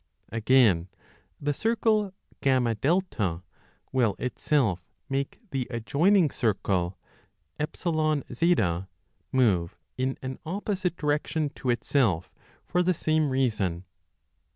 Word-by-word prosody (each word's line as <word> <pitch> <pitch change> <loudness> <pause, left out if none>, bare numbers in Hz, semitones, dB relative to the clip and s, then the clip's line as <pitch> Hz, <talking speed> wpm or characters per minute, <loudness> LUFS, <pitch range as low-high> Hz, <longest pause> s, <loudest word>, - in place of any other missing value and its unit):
Again, 110 -6 +4 0.5
the 145 0 0
circle 215 +1 +1 0.3
FA 125 - +1 0.5
will 120 -6 +2
itself 120 - 0 0.2
make 135 0 -2
the 130 -3 -2
adjoining 150 - +3
circle 95 -5 0 0.6
EZ 150 +4 -4 1.5
move 100 -10 +2 0.2
in 130 +1 0
an 130 0 -5
opposite 185 +1 -2
direction 150 0 0
to 130 - -5
itself 115 - +1 0.3
for 180 - +1
the 180 0 +2
same 155 -1 +1
reason. 105 -10 0
130 Hz, 90 wpm, -27 LUFS, 110-155 Hz, 1.5 s, Again